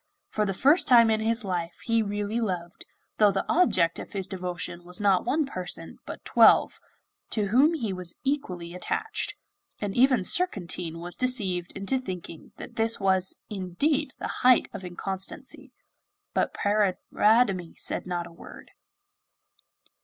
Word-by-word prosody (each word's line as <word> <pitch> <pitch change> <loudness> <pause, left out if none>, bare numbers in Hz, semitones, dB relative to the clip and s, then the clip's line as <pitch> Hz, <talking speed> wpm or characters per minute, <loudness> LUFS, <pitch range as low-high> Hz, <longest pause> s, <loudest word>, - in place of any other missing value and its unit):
For 210 -1 -1
the 195 - -1
first 290 - +4
time 235 -3 +7
in 220 - +2
his 225 +2 -1
life 175 -3 -3
he 230 -1 +2
really 205 +2 -2
loved, 180 -5 -4 0.3
though 210 -2 +6
the 195 - -2
object 185 - +2
of - - -9
his 195 -2 -2
devotion 180 -2 -5
was 180 +1 -4
not 195 -3 +3
one 295 +5 +1
person, 185 -9 -6
but - - -8
twelve, - - +5 0.5
to 210 -3 -1
whom 280 +9 +4
he 225 -10 -2
was 180 -2 -6
equally 180 -12 -3
attached, 310 - -2 0.4
and 205 -2 -3
even 255 -4 +4
Surcantine 180 - 0
was 175 +1 -6
deceived 195 -9 0
into 200 +7 -1
thinking 180 -8 -8
that - - -10
this 225 0 +2
was 190 -1 +1
indeed 260 - -1
the - - -5
height 255 -1 +5
of - - -7
inconstancy. 190 +2 -5 0.6
But - - +1
Paridamie 205 -1 +1
said - - -4
not 175 -1 -2
a 170 - -12
word. 170 - -13
195 Hz, 145 wpm, -27 LUFS, 180-235 Hz, 0.6 s, time